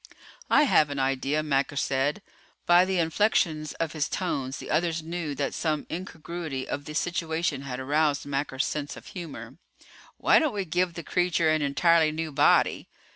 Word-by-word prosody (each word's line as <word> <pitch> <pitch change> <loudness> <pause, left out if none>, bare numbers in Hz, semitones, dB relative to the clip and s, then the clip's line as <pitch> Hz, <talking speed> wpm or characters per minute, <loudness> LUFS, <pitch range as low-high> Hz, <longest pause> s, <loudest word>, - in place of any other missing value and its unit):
"I 295 - +5
have 155 - +4
an 145 - -4
idea," 135 +3 0
Macker 140 -1 0
said. 140 +6 0 0.4
By 175 +1 +6
the 190 0 -1
inflections 165 -3 +1
of 165 -2 -3
his 155 -3 -2
tones 135 -8 -2
the - - -7
others 165 0 0
knew 165 -3 -4
that 140 -1 -2
some 155 -3 -1
incongruity 165 -5 -5
of 145 - -4
the 150 - -7
situation 165 -4 -1
had 130 -2 -5
aroused 145 +2 +1
Macker's 140 0 -1
sense 145 -2 -4
of - - -12
humor. 140 - -8 0.6
"Why - - +5
don't 310 -8 0
we 200 -2 -2
give 175 +1 0
the 170 - -6
creature 175 -2 +1
an 155 0 +1
entirely 155 +3 +3
new 160 0 -4
body? 145 +1 +3
155 Hz, 170 wpm, -27 LUFS, 140-170 Hz, 0.6 s, By